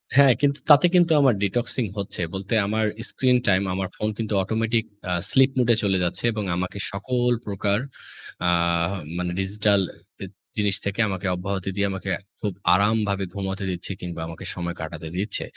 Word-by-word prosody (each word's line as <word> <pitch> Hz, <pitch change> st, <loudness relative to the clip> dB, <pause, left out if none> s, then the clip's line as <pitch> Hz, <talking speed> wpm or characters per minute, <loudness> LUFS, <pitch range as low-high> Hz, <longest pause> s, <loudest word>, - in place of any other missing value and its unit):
হ্যাঁ, 140 Hz, -3 st, +7 dB
কিন্তু 140 Hz, 0 st, +2 dB
তাতে 150 Hz, +2 st, +8 dB
কিন্তু 175 Hz, -2 st, +5 dB
আমার 135 Hz, -3 st, +5 dB
detoxing 120 Hz, +4 st, 0 dB
হচ্ছে 100 Hz, -2 st, -2 dB
বলতে 95 Hz, +3 st, -4 dB
আমার 110 Hz, +1 st, 0 dB, 0.2 s
screen 125 Hz, -1 st, +2 dB
time 100 Hz, 0 st, +3 dB
আমার 95 Hz, 0 st, -2 dB
ফোন 105 Hz, -, -2 dB
কিন্তু 110 Hz, -2 st, -3 dB
automatic 115 Hz, +3 st, 0 dB, 0.3 s
আ -, -, -1 dB, 0.2 s
sleep 135 Hz, 0 st, +5 dB
mode 120 Hz, -2 st, +3 dB
এ -, -, +3 dB
চলে 95 Hz, -2 st, +2 dB
যাচ্ছে 85 Hz, -, 0 dB
এবং 105 Hz, -1 st, -3 dB
আমাকে 90 Hz, +2 st, -3 dB
সকল 125 Hz, +5 st, 0 dB
প্রকার 100 Hz, 0 st, 0 dB, 0.7 s
আ -, -, +4 dB, 0.7 s
মানে 90 Hz, 0 st, -2 dB
digital 100 Hz, +1 st, +2 dB, 0.4 s
জি-জিনিস 100 Hz, +1 st, -2 dB
থেকে 100 Hz, +2 st, -3 dB
আমাকে 95 Hz, 0 st, -3 dB
অব্যাহত 95 Hz, +1 st, -4 dB
দিয়ে 100 Hz, 0 st, +1 dB
আমাকে 95 Hz, 0 st, -5 dB, 0.3 s
খুব 105 Hz, -3 st, -2 dB, 0.2 s
আরামভাবে 100 Hz, 0 st, +2 dB
ঘুমাতে 100 Hz, 0 st, -4 dB
দিচ্ছে 90 Hz, +2 st, -3 dB
কিংবা 85 Hz, -2 st, -5 dB
আমাকে 80 Hz, 0 st, -8 dB
সময় 85 Hz, -1 st, -4 dB
কাটাতে 80 Hz, 0 st, -6 dB
দিচ্ছে। 100 Hz, +2 st, +1 dB
100 Hz, 165 wpm, -24 LUFS, 95-115 Hz, 0.7 s, তাতে